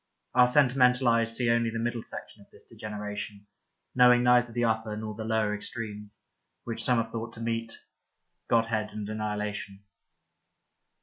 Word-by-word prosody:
Our 125 Hz, -, +6 dB
sentimental 125 Hz, -1 st, +4 dB
eyes 115 Hz, 0 st, +1 dB
see 120 Hz, -2 st, +2 dB
only 115 Hz, 0 st, +2 dB
the 115 Hz, -, -4 dB
middle 120 Hz, 0 st, -2 dB
section 105 Hz, -, -9 dB
of -, -, -27 dB
this -, -, -18 dB
degeneration, 105 Hz, -1 st, -7 dB, 0.5 s
knowing 125 Hz, -1 st, +6 dB
neither 125 Hz, -1 st, +4 dB
the 120 Hz, +1 st, -1 dB
upper 110 Hz, -1 st, -1 dB
nor 110 Hz, 0 st, -5 dB
the 110 Hz, +1 st, -6 dB
lower 110 Hz, -1 st, 0 dB
extremes, 105 Hz, -1 st, -6 dB, 0.4 s
which 115 Hz, -1 st, -2 dB
some 125 Hz, -1 st, +4 dB
have 115 Hz, -1 st, -1 dB
thought 115 Hz, +1 st, -5 dB
to -, -, -12 dB
meet, 115 Hz, 0 st, -3 dB, 0.7 s
godhead 115 Hz, -2 st, +1 dB
and 105 Hz, -1 st, -5 dB
annihilation. 105 Hz, -2 st, -4 dB
115 Hz, 150 wpm, -28 LUFS, 105-120 Hz, 0.7 s, Our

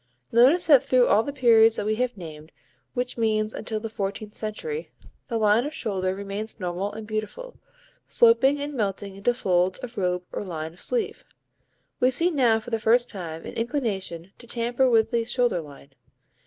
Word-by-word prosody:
Notice 260 Hz, +10 st, +5 dB
that 285 Hz, -5 st, +6 dB
through 255 Hz, -1 st, +4 dB
all 215 Hz, -, +4 dB
the 285 Hz, -, -4 dB
periods 230 Hz, -4 st, +5 dB
that 205 Hz, -, -3 dB
we 215 Hz, -, +1 dB
have 250 Hz, -2 st, -1 dB
named, 155 Hz, -3 st, -10 dB, 0.4 s
which 250 Hz, -1 st, -3 dB
means 215 Hz, -1 st, +1 dB
until 220 Hz, 0 st, -4 dB
the 225 Hz, -, -5 dB
fourteenth 210 Hz, 0 st, -5 dB
century, 445 Hz, -, -5 dB, 0.4 s
the 235 Hz, -4 st, -2 dB
line 215 Hz, +1 st, +3 dB
of 295 Hz, +3 st, -5 dB
shoulder 190 Hz, -8 st, -2 dB
remains 200 Hz, +3 st, -6 dB
normal 180 Hz, +2 st, -3 dB
and 220 Hz, 0 st, -7 dB
beautiful, 220 Hz, -, -5 dB, 0.4 s
sloping 290 Hz, -, +4 dB
and 290 Hz, +1 st, -4 dB
melting 200 Hz, -4 st, -3 dB
into 240 Hz, +5 st, +1 dB
folds 185 Hz, -4 st, +1 dB
of 245 Hz, -4 st, -7 dB
robe 180 Hz, -1 st, 0 dB
or -, -, -4 dB
line 160 Hz, -4 st, -5 dB
of 175 Hz, -, -16 dB
sleeve. 475 Hz, -4 st, -2 dB, 0.8 s
We 250 Hz, -, +4 dB
see 335 Hz, +8 st, +2 dB
now 245 Hz, -7 st, +3 dB
for 220 Hz, +2 st, -11 dB
the 225 Hz, -, 0 dB
first 240 Hz, +3 st, +3 dB
time 165 Hz, -5 st, -7 dB
an -, -, -7 dB
inclination 205 Hz, -, -3 dB
to 240 Hz, -, -12 dB
tamper 240 Hz, +2 st, +1 dB
with 225 Hz, -1 st, +3 dB
the 235 Hz, -1 st, +1 dB
shoulder 240 Hz, -5 st, 0 dB
line. 140 Hz, -2 st, -14 dB
220 Hz, 180 wpm, -25 LUFS, 195-250 Hz, 0.8 s, that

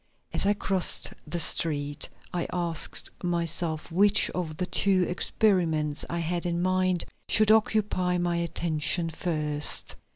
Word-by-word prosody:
As -, -, +1 dB
I 205 Hz, -, +2 dB
crossed 190 Hz, -3 st, +2 dB
the 170 Hz, +3 st, -4 dB
street, 145 Hz, -3 st, +1 dB, 0.2 s
I 175 Hz, -1 st, -2 dB
asked 170 Hz, -3 st, -2 dB
myself 170 Hz, -2 st, -1 dB
which 205 Hz, +4 st, +3 dB
of 160 Hz, -4 st, -5 dB
the 180 Hz, -, -2 dB
two 190 Hz, -1 st, +2 dB
experiments 170 Hz, -7 st, 0 dB
I 170 Hz, -, -3 dB
had 170 Hz, +1 st, -3 dB
in 170 Hz, -1 st, -2 dB
mind 185 Hz, -1 st, 0 dB, 0.2 s
should 215 Hz, 0 st, +4 dB
occupy 210 Hz, -5 st, +1 dB
my 175 Hz, -1 st, -1 dB
attention 165 Hz, 0 st, 0 dB
first. 150 Hz, -3 st, +1 dB
175 Hz, 130 wpm, -26 LUFS, 160-185 Hz, 0.2 s, should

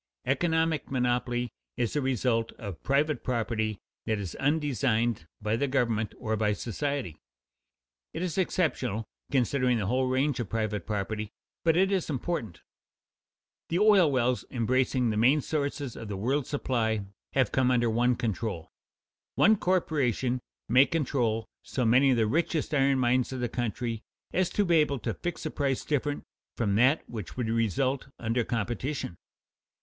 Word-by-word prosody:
Economic 160 Hz, +1 st, +1 dB
monopoly 125 Hz, -1 st, 0 dB, 0.3 s
is 120 Hz, -, -1 dB
a 150 Hz, -, +2 dB
result 125 Hz, -3 st, 0 dB
of 100 Hz, -7 st, -8 dB
private 140 Hz, 0 st, +1 dB
property 110 Hz, -3 st, -1 dB, 0.3 s
that 110 Hz, -, +1 dB
is 95 Hz, -4 st, -5 dB
undesigned 125 Hz, -, +1 dB, 0.2 s
by 105 Hz, +1 st, +1 dB
the 140 Hz, +5 st, 0 dB
government 115 Hz, -5 st, 0 dB
or 110 Hz, -2 st, -1 dB
by 105 Hz, -1 st, +1 dB
society. 125 Hz, -, -3 dB, 0.9 s
It 175 Hz, -, -4 dB
is 175 Hz, -4 st, -2 dB
exceptional, 135 Hz, -, 0 dB, 0.3 s
considering 125 Hz, -1 st, +2 dB
the 105 Hz, -, -1 dB
whole 130 Hz, +5 st, +1 dB
range 130 Hz, +1 st, +1 dB
of 115 Hz, -6 st, -3 dB
private 105 Hz, -4 st, -2 dB
property, 105 Hz, 0 st, -2 dB, 0.3 s
but 165 Hz, 0 st, +3 dB
it 190 Hz, +2 st, +3 dB
is 190 Hz, -4 st, 0 dB
important. 130 Hz, -, -3 dB, 1.1 s
The 170 Hz, -, +1 dB
oil 200 Hz, -6 st, +5 dB
wells 125 Hz, -1 st, +1 dB
embracing 125 Hz, 0 st, +1 dB
the 105 Hz, -, -2 dB
main 130 Hz, +7 st, +5 dB
sources 140 Hz, -3 st, -2 dB
of 115 Hz, -, -7 dB
the 100 Hz, -2 st, -4 dB
world's 130 Hz, +7 st, 0 dB
supply 110 Hz, -7 st, 0 dB, 0.3 s
have 130 Hz, -2 st, +2 dB
come 130 Hz, -1 st, +2 dB
under 120 Hz, -2 st, +3 dB
one 120 Hz, +2 st, +2 dB
control. 110 Hz, -7 st, -3 dB, 0.6 s
One 220 Hz, -, +6 dB
corporation 140 Hz, -, +1 dB, 0.3 s
may 130 Hz, +4 st, +6 dB
control 125 Hz, -7 st, 0 dB, 0.2 s
so 125 Hz, -, -2 dB
many 125 Hz, +5 st, +5 dB
of 130 Hz, -, +3 dB
the 115 Hz, -, +3 dB
richest 155 Hz, +6 st, 0 dB
iron 135 Hz, -1 st, +3 dB
mines 125 Hz, 0 st, +2 dB
of 130 Hz, -, -4 dB
the 120 Hz, -1 st, -1 dB
country 115 Hz, -1 st, -2 dB, 0.3 s
as 185 Hz, -1 st, +2 dB
to 205 Hz, -, +1 dB
be 170 Hz, -2 st, +4 dB
able 150 Hz, -3 st, +2 dB
to 115 Hz, -, -3 dB
fix 175 Hz, -1 st, -5 dB
a -, -, -2 dB
price 135 Hz, -3 st, -1 dB
different 145 Hz, 0 st, -1 dB, 0.3 s
from 105 Hz, -4 st, +1 dB
that 130 Hz, +9 st, +3 dB
which 110 Hz, -4 st, -7 dB
would 125 Hz, -3 st, -1 dB
result 130 Hz, +5 st, 0 dB
under 115 Hz, +1 st, 0 dB
competition. 120 Hz, -, -3 dB
125 Hz, 155 wpm, -28 LUFS, 115-140 Hz, 1.1 s, One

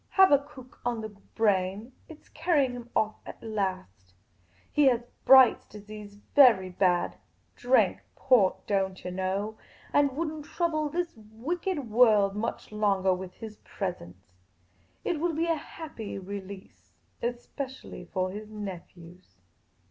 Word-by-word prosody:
Habakkuk 285 Hz, -8 st, +2 dB
on 235 Hz, -2 st, -1 dB
the 220 Hz, -, -5 dB
brain; 205 Hz, +1 st, -1 dB, 0.2 s
it 315 Hz, -2 st, -13 dB
's -, -, -25 dB
carrying 300 Hz, -5 st, +1 dB
him 240 Hz, -1 st, -8 dB
off 215 Hz, 0 st, +1 dB
at -, -, -11 dB
last. 185 Hz, -, -4 dB, 0.6 s
He 295 Hz, -, +4 dB
has 245 Hz, -3 st, +4 dB, 0.2 s
Bright's 260 Hz, -2 st, +7 dB
disease 210 Hz, 0 st, -10 dB
very 210 Hz, -4 st, +5 dB
bad 180 Hz, -1 st, +1 dB, 0.2 s
— -, -, -41 dB
drank 250 Hz, +2 st, +2 dB
port, 210 Hz, -8 st, +3 dB
don't 190 Hz, -2 st, -1 dB
yah 180 Hz, -, -3 dB
know 190 Hz, +4 st, -2 dB, 0.2 s
— -, -, -25 dB
and 285 Hz, -2 st, +3 dB
won't 310 Hz, -2 st, -3 dB
trouble 310 Hz, -3 st, -1 dB
this 345 Hz, +2 st, -3 dB
wicked 255 Hz, -, -4 dB
world 210 Hz, -4 st, +5 dB
much 225 Hz, +1 st, -4 dB
longah 195 Hz, -3 st, +2 dB
with 180 Hz, 0 st, -8 dB
his 220 Hz, -1 st, -9 dB
presence. 95 Hz, -, -7 dB, 0.7 s
It 330 Hz, -, -1 dB
will 335 Hz, 0 st, 0 dB
be 330 Hz, +2 st, +1 dB
a 335 Hz, -, +2 dB
happy 290 Hz, -8 st, -7 dB
release 195 Hz, 0 st, -9 dB
— -, -, -40 dB
especially 255 Hz, +3 st, -5 dB
for 185 Hz, -1 st, -2 dB
his 210 Hz, +2 st, -8 dB
nephews." 180 Hz, -, -10 dB
215 Hz, 140 wpm, -28 LUFS, 190-270 Hz, 0.7 s, Bright's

